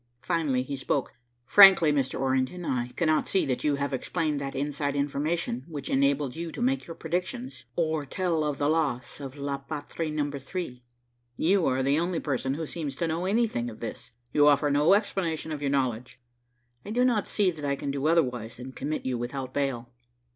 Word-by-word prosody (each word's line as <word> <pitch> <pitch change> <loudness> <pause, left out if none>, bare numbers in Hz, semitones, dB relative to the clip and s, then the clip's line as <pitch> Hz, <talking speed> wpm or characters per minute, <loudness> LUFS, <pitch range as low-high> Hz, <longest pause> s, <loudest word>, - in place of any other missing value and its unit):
Finally 145 -7 +1
he 140 +2 -4
spoke. 135 0 -1 0.3
"Frankly, 190 -3 +8
Mr. 135 -2 0
Orrington, 130 +6 0
I 125 -4 -1
cannot 155 -3 +2
see 190 - +2
that 130 -2 -2
you 150 -1 +2
have 140 0 -2
explained 150 +2 -1
that 135 -1 -4
inside 145 +1 -1
information 140 -2 -1
which 145 -5 -6
enabled 140 0 +2
you 165 0 -4
to - - -7
make 260 0 0
your 165 - -7
predictions, 130 -8 -4
or 160 -2 +1
tell 165 +2 -1
of 150 -2 -1
the 145 - +1
loss 145 -7 0
of 135 -2 -7
the 145 - -10
La 140 -1 -2
Patrie 155 +3 -5
Number 145 -2 -2
3. 135 -3 -5 0.6
You 185 +2 +3
are 130 0 +1
the 140 +3 +3
only 170 0 0
person 135 -2 -1
who 160 +1 -3
seems 150 -4 -4
to 170 - -1
know 165 +3 -1
anything 205 - +1
of 110 - -11
this. 115 - -6 0.2
You 145 0 +5
offer 145 0 +4
no 150 +7 +5
explanation 170 -6 -1
of 150 -2 -4
your 140 - 0
knowledge. 130 -3 -1 0.6
I - - -9
do 245 +3 +2
not 230 -5 +2
see 200 -4 +2
that 155 -3 -10
I 140 -1 +1
can 140 0 -3
do 140 +1 -1
otherwise 125 -9 +1
than 125 +2 -8
commit 155 +3 -4
you 125 -2 -1
without 130 +1 -4
bail." 130 -4 -2
145 Hz, 195 wpm, -27 LUFS, 135-165 Hz, 0.6 s, Frankly